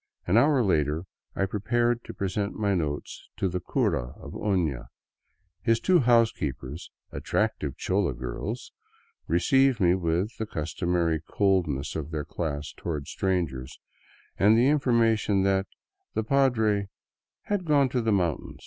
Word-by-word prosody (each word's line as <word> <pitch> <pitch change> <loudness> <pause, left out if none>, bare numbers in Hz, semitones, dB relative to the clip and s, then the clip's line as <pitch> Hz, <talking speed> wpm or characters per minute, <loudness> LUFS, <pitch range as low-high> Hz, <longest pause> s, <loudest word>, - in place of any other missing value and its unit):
An 90 - +1
hour 135 +2 +5
later 80 -4 +1 0.3
I 95 - +1
prepared 120 +4 0
to - - -8
present 100 +1 -2
my 100 -2 0
note 75 -5 -1 0.3
to 95 - 0
the 90 0 -2
cura 60 -7 -1
of - - -9
Ofia. 85 - -1 0.7
His 115 -2 +2
two 185 -2 +4
housekeepers, 85 - +1 0.2
attractive - - -1
chola 95 -8 0
girls, 65 - -5 0.6
received 135 -3 +3
me 90 -3 +4
with 90 +4 -1
the 110 - -2
customary 85 -1 -1
coldness 85 -9 0
of 75 -2 -4
their 75 -2 -3
class 75 -3 -4
toward 75 -4 -4
strangers, 80 -9 -2 0.6
and 105 +3 +5
the 125 +4 +4
information 115 -8 +2
that 95 0 +1 0.5
the 110 - 0
padre 110 -6 +2 0.3
" - - -67
had 205 -3 +1
gone 145 -3 +4
to 125 0 0
the 115 -1 +1
mountain." 90 -6 -1
95 Hz, 140 wpm, -27 LUFS, 80-115 Hz, 0.7 s, hour